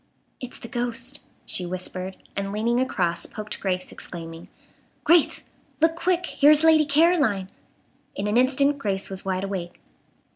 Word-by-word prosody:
"It's 250 -1 -8
the - - -9
ghost," 240 -1 -2 0.3
she 180 - -1
whispered; 185 +1 -3 0.2
and 195 0 -3
leaning 230 +4 0
across 175 -9 0
poked 215 0 -6
Grace, 185 -2 -2
exclaiming: 165 -1 -8 0.5
"Grace! 335 -1 +4 0.4
Look 325 +1 +3
quick! 360 +1 0
here 290 - +4
is 305 +1 +6
Lady 320 -1 +6
Caroline!" 285 - +3 0.7
In 200 - -3
an 210 +1 0
instant 275 +3 +3
Grace 195 -5 -2
was 190 0 -4
wide 190 0 -1
awake. 190 -3 -5
215 Hz, 145 wpm, -24 LUFS, 190-285 Hz, 0.7 s, is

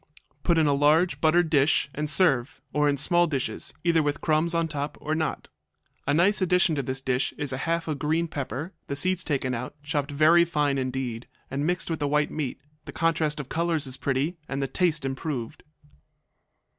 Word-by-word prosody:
Put 170 +1 +2
in 160 - +4
a 145 - +3
large 155 +5 +3
buttered 160 +1 +3
dish 145 -1 +3
and 150 0 -3
serve, 145 -7 +2
or 150 0 +3
in 140 - +1
small 175 +5 +3
dishes, 135 -5 -3
either 170 -2 +3
with 145 -1 -1
crumbs 160 +2 +1
on 165 -1 +1
top 145 -1 -4
or 155 - -2
not. 160 0 -2 0.6
A 145 - +3
nice 195 +5 +3
addition 180 -2 +3
to 145 - 0
this 130 0 -4
dish 130 0 -1
is 145 -3 -3
half 165 +6 -1
a 155 - 0
green 155 +4 0
pepper, 145 - -5
the 140 - -3
seeds 185 +5 +1
taken 135 -6 -1
out, 125 +3 -5
chopped 145 -1 -2
very 155 +4 +5
fine 150 -4 0
indeed, 130 -2 -3 0.2
and 140 +3 -1
mixed 180 -1 -1
with 160 - -2
the 145 - 0
white 150 +1 +1
meat; 145 -5 -3 0.3
the - - -7
contrast 160 -2 0
of 145 - -5
colors 165 -2 0
is 130 -1 -4
pretty 140 +6 -1
and 135 - -2
the 135 - -1
taste 165 -2 0
improved. 135 -3 -4
150 Hz, 195 wpm, -26 LUFS, 140-165 Hz, 0.6 s, very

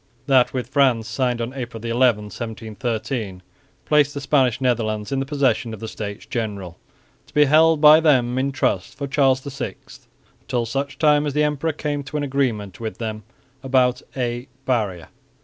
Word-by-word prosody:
That 130 -3 +4
with 125 -1 -4
France, 130 -5 +2
signed 120 +1 -1
on 115 +2 -4
April 120 -4 -6
11, 115 -2 +2
1713, 110 -2 -4 0.4
placed 145 -1 +3
the - - -2
Spanish 130 -5 +2
Netherlands 110 -4 -1
in 135 - 0
the 135 - -3
possession 125 -5 0
of - - -14
the 110 - -6
States 105 -2 -6
General, 100 -7 -4 0.5
to - - -22
be 150 0 +6
held 155 +2 +4
by 155 +1 +9
them 130 -6 +3
in 135 +1 0
trust 95 -8 -1
for 140 - -3
Charles 135 -1 +2
VI 140 -1 -5 0.6
until 120 -2 -2
such 135 +5 -3
time 150 -1 +3
as 145 - -2
the 150 +1 +2
emperor 150 +2 0
came 145 -1 -3
to 145 +3 -4
an 145 - -1
agreement 125 -8 -1
with 110 -1 -5
them 110 -2 -4 0.4
about 130 -2 +2 0.2
a 120 0 -2 0.2
"Barrier." 105 -9 -1
125 Hz, 170 wpm, -22 LUFS, 115-140 Hz, 0.6 s, by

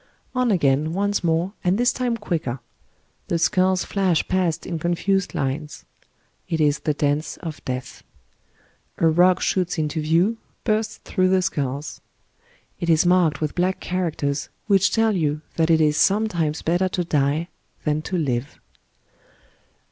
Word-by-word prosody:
On 255 -1 +1
again, 155 -4 +2
once 205 +1 0
more, 170 +3 0
and 180 +2 +2
this 245 +1 +2
time 245 -2 -1
quicker. 160 - -3 0.7
The 170 - 0
skulls 185 +1 +2
flash 185 -5 +1
past 180 -4 0
in 170 -2 -3
confused 180 +3 0
lines. 145 +3 -3 0.6
It 165 -2 -1
is 150 -1 +2
the 150 - -1
dance 145 +2 -1
of 160 -4 -7
death. 130 0 -5 0.9
A - - +1
rock 175 +3 +4
shoots 180 -2 0
into 155 0 -1
view, 170 +9 +2 0.3
bursts 215 -1 0
through 185 -1 +1
the 185 0 +3
skulls. 145 -5 -3 0.8
It 170 - -2
is 160 +1 +4
marked 175 -5 +3
with 155 -2 -1
black 185 +1 0
characters, 155 -6 -2 0.2
which 195 -3 +4
teU 225 -1 +2
you 155 -6 0 0.2
that 165 0 +2
^^ - - +5
it 160 - +5
is 150 -1 +3
sometimes 180 -7 +1
better 175 +3 +1
to 180 -1 -1
die 150 +1 0 0.3
than 150 0 0
to 185 +3 -3
live." 135 -4 -2
170 Hz, 150 wpm, -23 LUFS, 150-185 Hz, 0.9 s, ^^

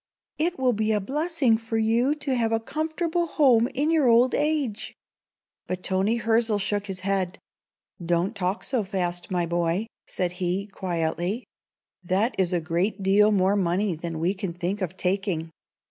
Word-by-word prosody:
It 345 +3 0
will 255 -2 +2
be 215 0 0
a 210 - +2
blessing 275 - +1
for 225 0 -3
you 230 +6 +2
to 275 -2 -2
have 230 -3 +1
a 225 - +2
comfortable 320 +6 -2
home 250 -7 +4
in 290 +5 0
your 310 -5 +3
old 240 +2 +5
age." 290 -8 -1 0.7
But 185 0 -4
Toni 195 +4 +2
Hirzel 225 -1 +2
shook 205 +1 -1
his 190 -2 -4
head. 190 0 -1 0.7
"Don't 175 +5 0
talk 190 +2 -1
so 255 -4 0
fast, 180 -2 -2
my 180 -2 0
boy," 170 +4 0 0.2
said 180 -2 -1
he, 185 +2 0
quietly. 180 +2 -2 0.6
"That 195 +7 +1
is 185 -2 +3
a 175 - +2
great 175 +5 -1
deal 205 +2 +5
more 195 0 +3
money 190 +1 +1
than 165 0 -5
we 170 +4 +1
can 190 -3 -4
think 180 +4 -3
of 185 0 -3
taking. 180 -4 -1
205 Hz, 165 wpm, -25 LUFS, 180-235 Hz, 0.7 s, old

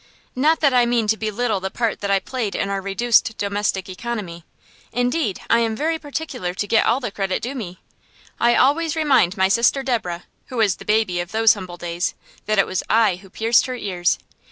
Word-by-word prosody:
Not 310 +5 +2
that 285 -4 +4
I 245 -1 +4
mean 235 -2 +1
to 220 - +4
belittle 220 0 -1
the 190 +1 -3
part 230 +1 -2
that 200 - -2
I 195 - +4
played 225 0 -4
in 195 - -1
our 195 -1 -2
reduced 225 +3 +2
domestic 200 -2 -1
economy. 190 -4 -5 0.5
Indeed, 245 - 0
I 230 - +4
am 225 -1 0
very 320 +6 -1
particular 280 - -5
to 205 - -2
get 225 - +3
all 235 +4 +3
the 245 -6 -4
credit 195 -2 -2
due 250 +4 -3
me. 190 -9 -7 0.6
I 240 0 +4
always 310 +4 +2
remind 275 - +3
my 190 0 +4
sister 235 +6 +2
Deborah, 210 -10 -2 0.2
who 255 - -7
was 210 -5 +2
the - - -12
baby 210 -5 +1
of 175 0 -4
those 225 0 +5
humble 185 -4 -8
days, 175 +1 -3 0.3
that 215 0 +1
it 195 - +5
was 185 - -2
I 220 -5 +3
who 190 +1 -16
pierced 225 +6 +2
her 255 - -4
ears. 180 -7 0
220 Hz, 205 wpm, -21 LUFS, 190-245 Hz, 0.6 s, those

